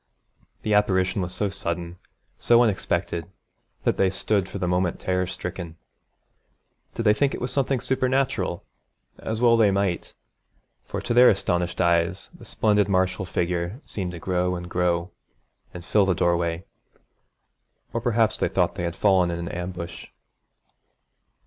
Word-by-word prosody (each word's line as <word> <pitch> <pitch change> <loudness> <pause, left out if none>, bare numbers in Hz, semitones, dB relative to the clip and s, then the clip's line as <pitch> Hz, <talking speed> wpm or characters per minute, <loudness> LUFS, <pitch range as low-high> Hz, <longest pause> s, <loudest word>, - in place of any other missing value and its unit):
The 105 - 0
apparition 95 -2 +2
was 90 0 -3
so 105 +2 -1
sudden, 85 -2 -4 0.4
so 120 0 +5
unexpected, 95 -5 -1 0.5
that - - +1
they 95 - +3
stood 95 0 0
for - - -6
the 90 -2 -2
moment 90 -1 0
terror 90 -1 0
stricken. 90 -2 -6 1.2
Did 115 - -2
they 105 -1 +5
think 140 +5 +1
it 125 - -3
something 135 -1 0
supernatural? 130 -7 0 0.6
as 110 +1 -4
well 120 -1 +5
they 110 -3 +5
might, 95 -3 -1 0.7
for - - -4
to 120 - -2
their 125 +1 +8
astonished 90 -3 0
eyes 85 +1 +1
the - - -14
splendid 105 -2 +1
martial 95 0 +1
figure 90 +5 -2
seemed 90 -3 -5
to - - -6
grow 90 +1 0
and 85 0 -6
grow, 90 0 0 0.6
and 90 -1 -9
fill 100 0 +3
the 95 - +2
doorway. 85 +1 0 1.3
Or 115 - -1
perhaps 115 -1 +1
they - - +1
thought 90 -2 +1
they 90 - -5
had 85 - -11
fallen 95 -3 +3
in 85 - -2
an 85 0 -5
ambush. 90 -1 -6
95 Hz, 150 wpm, -24 LUFS, 85-105 Hz, 1.3 s, their